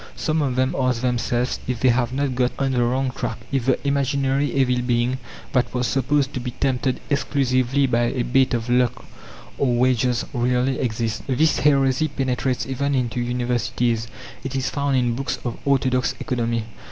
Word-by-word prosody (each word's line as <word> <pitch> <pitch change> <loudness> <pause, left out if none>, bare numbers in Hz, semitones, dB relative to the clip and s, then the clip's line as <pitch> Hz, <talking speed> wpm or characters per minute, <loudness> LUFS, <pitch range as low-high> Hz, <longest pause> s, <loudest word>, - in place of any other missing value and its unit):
Some 155 -1 0
of 135 -4 0
them 130 +1 +1
ask 130 -2 +1
themselves 125 0 0
if 125 -2 -2
they 130 - +5
have 120 0 +1
not 135 0 -1
got 125 0 +1
on 135 -1 0
the 125 -2 +2
wrong 130 +2 0
track: - - -4
if 135 -2 -1
the 130 - +4
imaginary 140 0 +1
evil 125 -2 +2
being, 125 +1 0 0.3
that 125 -2 +1
was 125 0 +1
supposed 135 +3 +1
to - - -2
be 125 0 -4
tempted 130 +1 -1
exclusively 135 -1 +1
by 120 -2 +2
a 125 +1 -1
bait 130 +1 +2
of 115 0 -3
lucre 125 0 +1 0.5
or 125 -3 +2
wages, 125 -1 +2
really 125 +1 +1
exists. 110 -2 -2
This 150 +4 +2
heresy 135 0 +3
penetrates 130 -2 -1
even 140 +2 -1
into 125 -2 -1
universities; 120 -1 -1 0.4
it 135 0 -4
is 130 -1 -1
found 140 -2 0
in 120 -2 +1
books 135 +3 -2
of 120 - -3
orthodox 130 -2 +1
economy. 115 -2 -1
130 Hz, 175 wpm, -22 LUFS, 120-135 Hz, 0.5 s, they